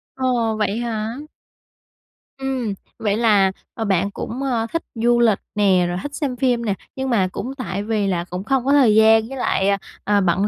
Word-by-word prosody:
Ồ, 245 -4 0
vậy 210 0 0
hả? 225 0 -3 1.2
Ừm. 265 -5 -2 0.3
Vậy 210 -1 0
là, 205 -4 +4 0.2
ờ, 225 - -3
bạn 195 0 +1
cũng, 250 +6 -5
ơ, 235 -4 0
thích 330 - -1
du 240 +1 +2
lịch 225 -4 +3 0.2
nè, 190 -4 +3
rồi 175 0 -2
thích 290 0 -6
xem 275 -4 -2
phim 245 -2 +1
nè, 205 - +1 0.2
nhưng 265 0 -3
mà 205 -7 +2
cũng 260 +7 -5
tại 200 -6 -3
vì 210 -2 0
là 175 -3 0
cũng 180 +1 -4
không 260 +3 0
có 275 - +2
thời 260 -7 +5
gian 220 0 +5
với 270 - -6
lại, 195 -5 +1
ờ, 200 - +2 0.3
ờ, 205 -1 +2
bận 185 +2 +2
225 Hz, 200 wpm, -21 LUFS, 200-250 Hz, 1.2 s, thời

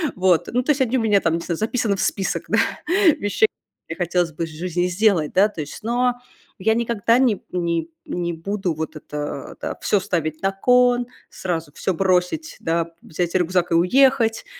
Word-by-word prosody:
вот. 180 -2 +2
Ну, 250 - +2
то 300 - +2
есть 285 -2 0
одни 260 0 +2
у - - +1
меня 210 -3 +3
там, 165 - +1
не - - -2
знаю, 170 0 -3
записаны 220 0 0
в 195 - -3
список, 195 - -1
да, - - +2 0.6
вещей, 205 - +2 0.4
которые - - -6
хотелось 175 -1 0
бы 165 +3 -3
в - - -9
жизни 175 +2 -2
сделать, 180 -4 +2
да, 195 +3 +5
то 170 - -6
есть. 150 +8 -8
Но 245 +2 +1 0.5
я 220 +4 +2
никогда 230 -1 +2
ни 250 -6 +2
ни 170 -2 -1 0.2
не 175 -1 -3
буду 190 +2 -2
вот 160 +1 -5
это, 145 -2 -6
да, - - -3
всё 205 - +2
ставить 165 -5 -2
на 195 - +2
кон, 245 +4 +3 0.2
сразу 165 -4 -4
всё 190 - -1
бросить, 185 - 0
да, 165 0 -1
взять 170 +1 -3
рюкзак 180 0 +1
и - - +2
уехать. 230 +5 +3
185 Hz, 190 wpm, -22 LUFS, 170-225 Hz, 0.6 s, да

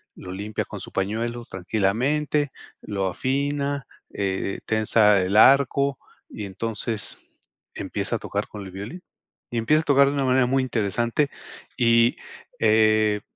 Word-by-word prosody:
lo 90 - -9
limpia 105 +3 -4
con - - -8
su - - -8
pañuelo 115 +4 -2
tranquilamente, 125 - 0 0.3
lo 100 -2 -2
afina, 140 +5 -1 0.3
eh 95 -1 -2
eh, - - -11
tensa 110 -2 +4
el 95 +3 +1
arco 140 +2 +5 0.3
y 105 - -6
entonces 110 +2 -3 0.6
empieza - - -2
a - - -14
tocar - - -3
con 105 -2 -9
el 95 - -9
violín, 105 - -8 0.5
y 120 - -2
empieza 155 +8 +3
a - - -12
tocar 140 -1 +5
de 140 - 0
una 140 -1 0
manera 130 0 +3
muy 135 +1 +2
interesante. 120 +4 0 0.5
Y, 115 -1 +4 0.4
eh, 110 -1 +3
115 Hz, 145 wpm, -24 LUFS, 105-135 Hz, 0.6 s, arco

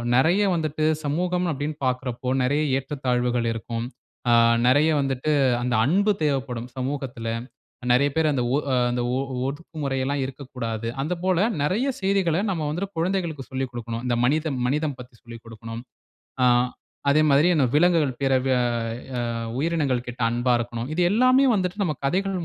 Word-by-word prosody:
நெறைய 170 +10 +4
வந்துட்டு 155 -1 -1 0.2
சமூகம் 180 +4 0
அப்பிடீன்னு 150 +2 -3
பாக்குறப்போ 125 0 -2
நெறைய 145 +4 +1 0.2
ஏற்றத்தாழ்வுகள் 125 -3 -1
இருக்கும். 115 +1 -4 0.5
அ, - - +6 0.3
நெறைய 145 +5 +4
வந்துட்டு 135 +2 -1 0.3
அந்த 125 0 -1
அன்பு 200 +8 +3
தேவைப்படும், 130 -4 -1
சமூகத்துல. 130 -3 -4 0.6
நெறைய 140 +3 +4
பேர் 160 -1 +3
அந்த 125 -3 0
ஒ - - +3 0.2
அ, - - +3 0.2
அந்த 120 0 -1 0.2
ஒ - - 0 0.3
ஒதுக்குமுறை 145 -2 -4
எல்லாம் 140 +1 -1
இருக்கக்கூடாது, 125 -4 -5
அந்த 160 +6 -1
போல 185 -2 +2 0.2
நெறைய 215 - +1
செய்திகள 190 -4 +1
நம்ம 160 -5 -1
வந்துட்டு 195 +5 -4
குழந்தைகளுக்கு 170 -6 -2
சொல்லிக் 130 -1 -3
குடுக்கணும். 115 0 -5
இந்த 120 -1 +1
மனிதம், 150 -1 0
மனிதம் 150 0 -1
பத்தி 125 -1 -12
சொல்லிக் 115 -1 -11
குடுக்கணும். 115 +1 -8 0.6
ஆ, - - +5 0.6
அதேமாதிரியே 155 +3 +4
இந்த 135 -4 +3
விலங்குகள் 155 -5 +3
பேர 135 0 +2
வெ 130 - +2 0.7
அ - - -1 0.4
உயிரினங்கள் 145 -6 0
கிட்ட 120 +1 -8
அன்பா 120 +1 +1
இருக்கணும். 120 +1 -4
இது 180 - -1
எல்லாமே 255 +4 +5
வந்துட்டு 190 +1 -1
நம்ம 155 -4 -1
கதைகள் 185 +2 -1
140 Hz, 150 wpm, -24 LUFS, 125-165 Hz, 0.7 s, அ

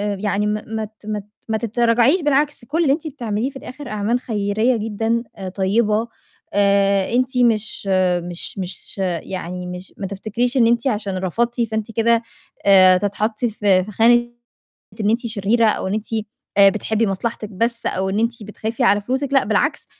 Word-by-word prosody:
يعني 205 +1 -1
ما 210 0 -1
ما 220 0 -3
ت 215 0 -20
ما 210 -1 -2
ت 200 - -12 0.2
ما 220 - +1
تتراجعيش 235 - +2
بالعكس 290 -3 +1
كل 320 +6 -1
اللي 275 -3 +4
أنتِ 315 +1 -4
بتعمليه 235 -3 -2
في - - -27
الآخِر 260 +1 -9
أعمال 215 +3 0
خيريّة 220 +1 0
جدًا 225 +2 -1
آآ، 190 -2 -6
طيّبة، 210 +4 +1 0.5
آآ 200 0 +2
أنتِ 255 +1 +1
مش 220 -4 +1 0.4
مش 175 +2 -4
مش 180 +2 -4 0.3
يعني 180 -1 -5
مش 180 +1 -8
ما 195 - -4
تفتكريش 225 +6 -2
إن 230 -2 +5
أنتِ 235 +2 +2
عشان 205 -5 -1
رفضتِ 235 +7 -1
فأنتِ 220 -1 -2
كده 230 +1 +2 0.4
آآ، 185 -2 +7
هتتحطّي 215 +4 -1
في 200 -3 +2
في 210 - -9
خانة 240 +3 +4 0.7
إن 210 0 +2
أنتِ 235 +2 0
شريرة 220 +1 +2
أو - - -1
إن 195 - -1
أنتِ 215 0 -3 0.5
آآ، 200 0 +9
بتحبّي 220 +1 -1
مصلحتِك 215 +2 -3
بس 230 +4 -1
أو 190 +1 -1
إن 200 - -1
أنتِ 230 0 -1
بتخافي 215 +2 -4
على 205 +1 +4
فلوسِك 265 +5 -2
لأ 270 - +4
بالعكس، - - 0
220 Hz, 175 wpm, -20 LUFS, 200-235 Hz, 0.7 s, آآ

